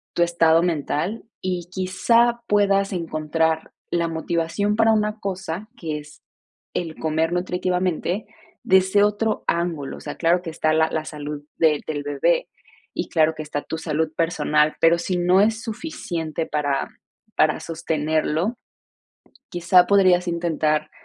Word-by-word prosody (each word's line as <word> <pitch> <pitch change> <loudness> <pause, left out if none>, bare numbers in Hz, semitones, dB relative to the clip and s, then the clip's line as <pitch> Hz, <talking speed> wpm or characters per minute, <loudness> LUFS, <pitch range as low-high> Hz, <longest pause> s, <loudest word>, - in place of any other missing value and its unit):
tu 175 - +4
estado 165 -1 +3
mental 175 +5 -1 0.2
y 180 -2 -3
quizá 230 +6 +2
puedas 200 -1 +2
encontrar 160 -1 -1 0.2
la 170 -1 +1
motivación 165 +5 -1
para 225 0 +4
una 210 0 0
cosa, 190 +1 -4
que 155 -6 -4
es 150 0 -15 0.5
el 165 -3 -3
comer 160 +1 0
nutritivamente, 180 +1 -1 0.4
desde 190 +2 +4
otro 210 +1 0
ángulo, 170 -5 -1
o - - -10
sea, - - -6
claro 175 +1 +2
que 175 - -6
está 155 -1 0
la 160 0 +3
la 155 -1 -2
salud 150 -1 -6
del 155 -3 +3
del 145 -2 -3
bebé 145 - +1 0.5
y - - -3
claro 160 -1 +3
que 155 - -5
está 145 -1 -4
tu 160 - -5
salud 160 -1 -1
personal, 155 -2 +1
pero 165 +1 +5
si 180 +1 -1
no 180 +2 +4
es 220 +2 +2
suficiente 175 - -4
para 145 -2 -1 0.5
para 155 - +3
sostenerlo, 160 +5 -1 0.9
quizá 180 0 +4
podrías 185 -3 +4
intentar, 155 -3 0
170 Hz, 140 wpm, -23 LUFS, 155-190 Hz, 0.9 s, pero